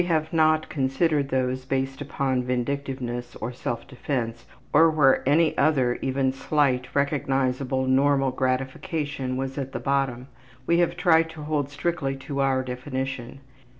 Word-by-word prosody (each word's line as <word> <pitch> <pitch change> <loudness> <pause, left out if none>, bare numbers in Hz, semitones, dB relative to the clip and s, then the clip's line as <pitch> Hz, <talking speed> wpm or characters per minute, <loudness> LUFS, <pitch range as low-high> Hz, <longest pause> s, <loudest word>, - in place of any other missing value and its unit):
We 175 - -3
have 160 -2 0
not 155 -1 +3
considered 140 +1 0
those 130 -1 0
based 135 +1 -2
upon 135 -2 -1
vindictiveness, 125 -1 -3
or 115 +3 -5
self 120 0 -4
defense, 120 -3 -4 0.3
or 165 +2 +7
where 145 -4 +4
any 160 +2 +3
other 135 -4 +2
even 135 0 +1
slight, 135 -2 +1
recognizable, 135 -2 0
normal 135 0 +3
gratification 130 +1 -2
was 135 +1 -3
at 135 -1 -5
the - - -3
bottom. 135 -3 0 0.4
We 170 +3 +3
have 175 0 +1
tried 165 -3 +4
to 155 -2 -9
hold 150 -2 -1
strictly 145 -2 -2
to 140 +1 -5
our 135 -1 +2
definition. 130 0 -5
135 Hz, 145 wpm, -25 LUFS, 130-150 Hz, 0.4 s, or